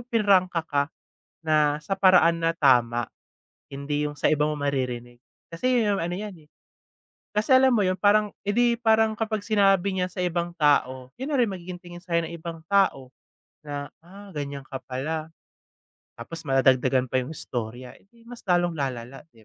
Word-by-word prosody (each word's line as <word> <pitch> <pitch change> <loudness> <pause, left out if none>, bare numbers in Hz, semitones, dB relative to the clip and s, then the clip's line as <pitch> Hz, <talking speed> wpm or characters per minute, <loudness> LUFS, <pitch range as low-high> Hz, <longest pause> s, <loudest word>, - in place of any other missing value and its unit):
pinrangka 190 -7 +2
ka 145 -2 0 0.6
na, 150 -2 +3
sa 195 -2 -3
paraan 180 -3 +5
na 165 0 0
tama. 120 -5 +2 0.6
Hindi 145 +2 -3
yung 145 - -6
sa 145 - +1
iba 150 -1 +2
mo 150 - -1
maririnig. 125 -4 -3 0.3
Kasi 250 +10 0
'yon 205 -2 +1
yong - - -2
ano 175 +1 -2
yan, 210 -2 -6
eh - - -41 0.9
kasi 215 +5 +2
alam 260 0 +6
mo 205 - +2
'yon 185 0 -1
parang, 210 0 +3 0.2
eh, - - +2
di 240 -1 +2
parang 220 -1 +3
kapag 215 -1 -3
sinabi 195 -3 +3
niya 185 -1 -1
sa 180 0 -4
ibang 175 0 -2
tao, 130 -4 +1
yun 270 - -3
na - - +2
rin 235 -5 +2
magiging 180 -1 -7
tingin 175 -1 -12
sa 175 -2 -2
'yo 170 - +1
ng 165 - -7
ibang 165 -1 -8
tao 155 -8 +1 0.5
na, 145 0 -5
"Ah 195 +4 -14
ganyan 140 -3 -5
ka 135 0 -7
pala." 155 +5 -4 0.8
Tapos, 165 +8 -8
madadagdagan 130 -1 +3
pa 130 +1 0
yung 125 - -7
istorya. 120 -2 -6
Eh, - - -27
di 230 -1 -23
mas 240 0 -11
lalong 175 -2 +2
lalala 130 -3 -5
'di 115 -5 -22
165 Hz, 180 wpm, -25 LUFS, 140-195 Hz, 0.9 s, alam